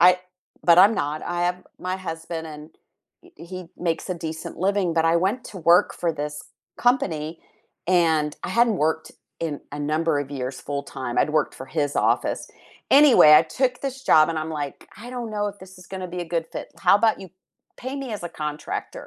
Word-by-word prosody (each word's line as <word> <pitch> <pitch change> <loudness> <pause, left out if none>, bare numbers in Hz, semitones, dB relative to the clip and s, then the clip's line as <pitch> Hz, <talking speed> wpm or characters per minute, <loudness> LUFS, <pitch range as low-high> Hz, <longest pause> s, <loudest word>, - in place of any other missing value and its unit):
I" 180 +1 +6 0.4
but 170 0 +6
I'm 205 +4 +7
not, 150 +2 -2
I 175 0 -2
have 180 +1 -2
my 185 +1 -3
husband 165 -2 -6
and 150 0 -10 0.5
e 355 - -18 0.2
he 185 - -4 0.3
makes 165 +3 -2
a 185 - -1
decent 160 -1 -6
living 190 -2 +1
But 165 0 +2
I 165 +1 +4
went 200 +8 0
to 190 - -9
work 180 - +4
for 170 -2 +1
this 150 0 -4 0.4
company 165 -11 0 0.5
and 160 -4 +2
I - - -3
hadn't 235 -3 +3
worked 160 0 -2 0.3
in 155 -3 -3
a 145 - -5
number 160 -1 +1
of 140 0 -6
years 130 -2 -5
full 140 0 -4
time. 130 -3 -5
I'd - - +3
worked - - -2
for 130 - -8
his 145 0 -2
office. - - +1 0.4
Anyway, 275 - +8
I 155 - +8
took 250 - -1
this 270 -1 -5
job 155 -1 +7
and 165 - -1
I'm 155 +1 -4
like, 140 - -8 0.2
"I - - -8
don't 240 -3 -5
know 205 0 0
if 200 - -10
this 190 0 -13
is 180 - -14
gonna 185 -1 -4
be - - -2
a 170 0 -12
good 165 -1 0
fit. - - -6 0.2
How - - +8
about 225 -2 +2
you 190 - -9 0.5
pay 260 +2 -6
me 250 -4 -6
as - - -12
a - - -3
contractor, 150 0 -5
170 Hz, 210 wpm, -24 LUFS, 155-190 Hz, 0.5 s, Anyway